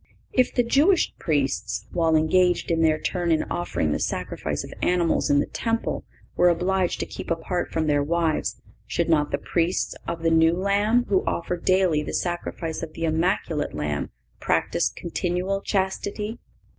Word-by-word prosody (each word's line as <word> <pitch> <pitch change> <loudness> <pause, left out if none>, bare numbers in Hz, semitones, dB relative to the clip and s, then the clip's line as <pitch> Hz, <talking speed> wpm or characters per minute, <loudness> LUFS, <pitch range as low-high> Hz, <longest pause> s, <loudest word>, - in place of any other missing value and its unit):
If 255 -1 +3
the 245 - +4
Jewish 305 +10 +3
Priests, 110 - -1
while 165 -2 +2
engaged 175 +3 +3
in 165 -1 +2
their 155 -1 +3
turn 175 -2 -1
in 160 - +3
offering 80 - -1
the - - 0
sacrifice - - -3
of - - -9
animals 175 -2 +2
in 145 0 +4
the - - +1
Temple, 230 0 -2 0.3
were 175 0 +5
obliged 180 +1 +1
to - - -1
keep - - -8
apart 170 +2 -2
from 160 -1 0
their 145 -1 +2
wives, 165 +1 0 0.3
should 170 +7 -1
not 150 -2 +3
the - - 0
Priests 170 +4 0
of 165 -1 -4
the 165 - +3
New 165 0 +5
Law, 200 +6 +2
who 195 -2 +2
offer 170 +1 -1
daily 180 -3 +2
the - - -4
sacrifice 175 -2 -3
of 160 -2 -6
the 165 - -3
Immaculate 160 - 0
Lamb, 75 -1 -2 0.3
practise - - +1
continual 180 +3 -2
chastity? 200 +3 -2
170 Hz, 165 wpm, -24 LUFS, 155-185 Hz, 0.3 s, were